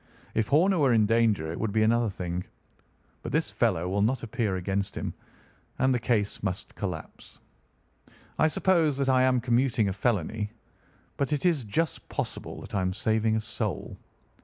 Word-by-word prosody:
If 110 Hz, -1 st, +1 dB
Horner 175 Hz, +6 st, +4 dB
were 135 Hz, -4 st, +4 dB
in 110 Hz, -2 st, +4 dB
danger 110 Hz, -8 st, +2 dB
it 85 Hz, -, -5 dB
would 110 Hz, -2 st, -1 dB
be 110 Hz, +1 st, +2 dB
another 115 Hz, +1 st, +3 dB
thing; 90 Hz, -2 st, -4 dB, 0.8 s
but -, -, -6 dB
this -, -, 0 dB
fellow 85 Hz, +2 st, +1 dB
will 100 Hz, +2 st, 0 dB
not 120 Hz, +5 st, +1 dB
appear 110 Hz, -3 st, -1 dB
against 95 Hz, +2 st, -2 dB
him, -, -, -3 dB, 0.6 s
and 130 Hz, +1 st, +3 dB
the 125 Hz, -, +1 dB
case 110 Hz, -4 st, 0 dB
must 95 Hz, -2 st, -3 dB
collapse. -, -, -6 dB, 1.0 s
I -, -, +5 dB
suppose 160 Hz, -3 st, +2 dB
that 135 Hz, -1 st, 0 dB
I 130 Hz, -1 st, +4 dB
am 130 Hz, -1 st, +4 dB
commuting 120 Hz, -2 st, +2 dB
a -, -, -2 dB
felony, 105 Hz, 0 st, -1 dB, 0.7 s
but 140 Hz, +1 st, -1 dB
it 150 Hz, -, -1 dB
is 165 Hz, -7 st, +3 dB
just 155 Hz, +9 st, -2 dB
possible -, -, -4 dB
that -, -, -11 dB
I 100 Hz, -, +1 dB
am 95 Hz, 0 st, 0 dB
saving 110 Hz, 0 st, +1 dB
a 110 Hz, -, 0 dB
soul. 110 Hz, -, -3 dB
115 Hz, 175 wpm, -28 LUFS, 100-130 Hz, 1.0 s, I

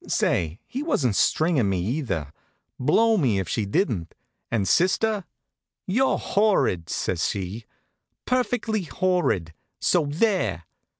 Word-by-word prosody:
Say, 85 Hz, +2 st, 0 dB
he 265 Hz, -, -5 dB
wasn't 140 Hz, -, 0 dB
stringin' 155 Hz, -, +2 dB
me 95 Hz, -2 st, 0 dB
either. 95 Hz, -, -2 dB, 0.5 s
Blow 220 Hz, -, +3 dB
me 125 Hz, -, +2 dB
if 95 Hz, -2 st, -2 dB
she 105 Hz, +5 st, -1 dB
didn't. 100 Hz, -, -1 dB, 0.3 s
And 105 Hz, -4 st, 0 dB
sister? 195 Hz, +2 st, +2 dB, 0.6 s
"You're 250 Hz, +8 st, +2 dB
horrid!" 195 Hz, -, +1 dB
says 85 Hz, -3 st, -1 dB
she. 100 Hz, +3 st, -5 dB, 0.6 s
"Perfectly 245 Hz, -4 st, 0 dB
horrid. 165 Hz, -, 0 dB, 0.3 s
So 165 Hz, -5 st, +2 dB
there!" 150 Hz, -, 0 dB
140 Hz, 115 wpm, -24 LUFS, -, 0.6 s, Blow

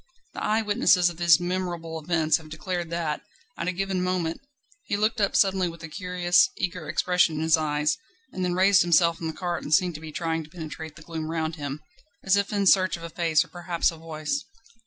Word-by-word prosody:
The -, -, -5 dB
eye 220 Hz, +1 st, +1 dB
witnesses 205 Hz, -5 st, +3 dB
of 170 Hz, -, -13 dB
these 170 Hz, -2 st, +5 dB
memorable 175 Hz, -3 st, -3 dB
events 160 Hz, -1 st, +2 dB
have 160 Hz, -1 st, -13 dB
declared 175 Hz, +2 st, -4 dB
that, 165 Hz, -3 st, -2 dB, 0.3 s
at 170 Hz, -, -4 dB
a -, -, +2 dB
given 190 Hz, 0 st, -2 dB
moment, 180 Hz, +1 st, -1 dB, 0.4 s
he 200 Hz, -, -2 dB
looked 215 Hz, +1 st, +1 dB
up 200 Hz, -, +1 dB
suddenly 190 Hz, -2 st, +3 dB
with 165 Hz, 0 st, -11 dB
a -, -, -5 dB
curious, 180 Hz, +1 st, +2 dB
eager 180 Hz, -4 st, -3 dB
expression 180 Hz, -3 st, +2 dB
in 155 Hz, -, -2 dB
his 160 Hz, -1 st, +5 dB
eyes, 150 Hz, -, 0 dB, 0.3 s
and 185 Hz, -, -3 dB
then 180 Hz, -1 st, 0 dB
raised 190 Hz, +1 st, +5 dB
himself 170 Hz, -1 st, +3 dB
in 165 Hz, -, -2 dB
the -, -, -2 dB
cart 175 Hz, +1 st, -3 dB
and -, -, -7 dB
seemed 180 Hz, -1 st, +1 dB
to 155 Hz, -, -8 dB
be 160 Hz, -1 st, -8 dB
trying 165 Hz, 0 st, -2 dB
to 150 Hz, -, -15 dB
penetrate 160 Hz, -2 st, -8 dB
the 155 Hz, -, -13 dB
gloom 160 Hz, -1 st, -5 dB
round 160 Hz, -1 st, -2 dB
him, 145 Hz, 0 st, -5 dB, 0.4 s
as 190 Hz, 0 st, +3 dB
if 200 Hz, +1 st, 0 dB
in 200 Hz, -1 st, 0 dB
search 185 Hz, -1 st, +4 dB
of 165 Hz, -, -12 dB
a 170 Hz, -, -7 dB
face, 165 Hz, -3 st, +2 dB
or -, -, -21 dB
perhaps 175 Hz, -1 st, -1 dB
a -, -, -10 dB
voice. 160 Hz, -, -3 dB
170 Hz, 220 wpm, -26 LUFS, 160-185 Hz, 0.4 s, these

